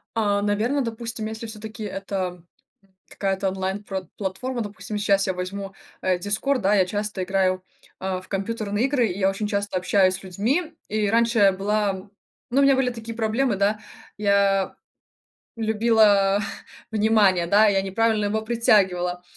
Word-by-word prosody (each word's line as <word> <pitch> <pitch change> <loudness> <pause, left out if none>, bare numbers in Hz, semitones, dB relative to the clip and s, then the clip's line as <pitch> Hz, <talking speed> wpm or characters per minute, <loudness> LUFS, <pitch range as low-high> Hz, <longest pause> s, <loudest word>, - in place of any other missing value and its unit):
А, 205 -2 +1
наверно, 215 +7 +1
допустим, 230 -2 -4
если 220 +1 -6
всё-таки 220 0 -8
это 195 -3 -4 0.7
какая-то 195 0 -1
онлайн 190 +2 -3
пр 190 -2 -5
платформа, 235 +6 -3
допустим, 210 0 -6
щас 200 -1 +2
я 190 - 0
возьму, 195 +2 -5 0.3
э, 185 -1 +1
Discord, 215 +8 0
да, 200 0 +2
я 190 -2 +4
часто 205 0 -3
играю, 185 0 +1 0.4
э, 190 -1 -2
в 185 - -17
компьютерные 205 +2 -1
игры, 270 -3 +2
я 190 0 +1
очень 195 +2 -3
часто 200 -2 -1
общаюсь 185 0 +3
с 190 - -10
людьми. 245 - -1 0.2
И 210 -1 0
раньше 230 +1 +2
я 200 -1 +6
была 200 0 -1 0.4
ну, 270 - +4
у - - +5
меня 275 -1 +5
были 260 -1 +1
такие 230 -1 -7
проблемы, 225 +1 +1
да, 205 +2 +1 0.4
я 200 -2 +2 0.8
любила 215 -3 +3 0.5
внимание, 210 -5 +3
да, 205 +5 +5
я 195 -1 +2
неправильно 215 +2 +1
его 215 +2 0
притягивала, 190 -6 +2
205 Hz, 150 wpm, -24 LUFS, 195-220 Hz, 0.8 s, я